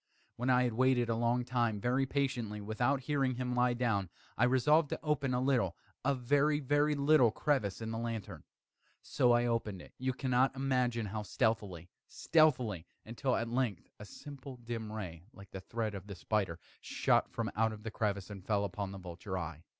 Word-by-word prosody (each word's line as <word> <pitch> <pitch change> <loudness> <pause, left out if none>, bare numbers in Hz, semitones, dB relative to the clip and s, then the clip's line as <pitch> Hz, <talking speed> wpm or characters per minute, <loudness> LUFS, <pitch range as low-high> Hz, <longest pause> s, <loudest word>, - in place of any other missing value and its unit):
When 125 +2 -2
I 125 0 +5
had 120 -2 0
waited 125 0 +2
a 115 - +1
long 120 +1 +1
time, 120 -4 0
very 130 +5 +1
patiently, 125 -6 -1
without 120 +6 0
hearing 135 -2 0
him 125 0 -2
lie 125 0 +2
down, 110 -7 0 0.3
I 120 - +3
resolved 145 +5 +4
to - - -3
open 140 -4 0
a - - +1
little 125 -9 +1 0.3
a 140 +1 +2
very, 145 +4 +2
very 145 +2 +2
little 140 -3 +5
crevice 110 -4 0
in 110 0 -4
the 115 - -3
lantern. 115 -3 -5 0.6
So 125 -4 +2
I 120 0 +4
opened 115 -5 -1
it - - -13
you 130 +1 0
cannot 130 0 +1
imagine 125 -4 0
how 105 +1 -4
stealthily, 100 -4 -1 0.2
stealthily 125 - +2 0.2
until, 125 +3 -1
at 115 - -1
length 120 -6 -2
a 105 - -8
simple 135 +2 -10
dim 115 -2 -5
ray, 90 -7 -6
like 100 -1 -14
the 95 - -7
thread 110 +1 -3
of 100 0 -8
the 100 - -7
spider, 95 -2 -1 0.2
shot - - +1
from - - -3
out 110 0 0
the 115 - -5
crevice 100 -2 -2
and 100 -2 -8
fell 100 0 +1
full - - 0
upon 100 0 -4
the 100 - -7
vulture 90 +1 -6
eye. 80 -3 -5
120 Hz, 190 wpm, -33 LUFS, 105-130 Hz, 0.6 s, I